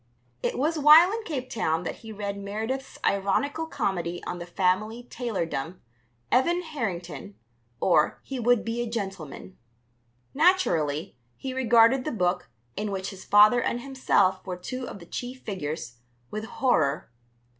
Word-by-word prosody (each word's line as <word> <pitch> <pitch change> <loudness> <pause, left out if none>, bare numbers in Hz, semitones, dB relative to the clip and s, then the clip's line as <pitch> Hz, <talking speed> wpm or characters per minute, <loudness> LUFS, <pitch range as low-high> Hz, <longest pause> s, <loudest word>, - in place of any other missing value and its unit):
It - - -1
was 310 +4 0
while 310 +5 +8
in 450 +1 -3
Cape 265 -6 -3
Town 170 -9 -1
that - - -4
he 225 -2 -10
read 200 -1 -4
Meredith's 220 +7 -4
ironical 280 +11 0
comedy 175 - -2
on 175 - -5
the 175 - -7
family 200 +6 0
tailordom, 180 - -3 0.5
Evan 340 +8 +3
Harrington; 200 - -5 0.4
or 180 - +3
He 265 -2 -5
Would 240 -1 +3
be 230 +1 -2
a 240 - -3
Gentleman. 190 - -6 0.7
Naturally, 175 - +2 0.2
he 265 -1 -5
regarded 245 0 +4
the - - -2
book 180 -4 0 0.3
(in 210 0 -2
which 195 0 -3
his 190 -1 -11
father 210 +4 +6
and 240 +1 -1
himself 250 -8 +1
were 180 -2 -5
two 255 +8 -5
of - - -7
the 170 - -12
chief 250 +7 -6
figures) 150 - -5 0.3
with 215 +1 -4
horror. 160 - +1
215 Hz, 145 wpm, -26 LUFS, 180-255 Hz, 0.7 s, while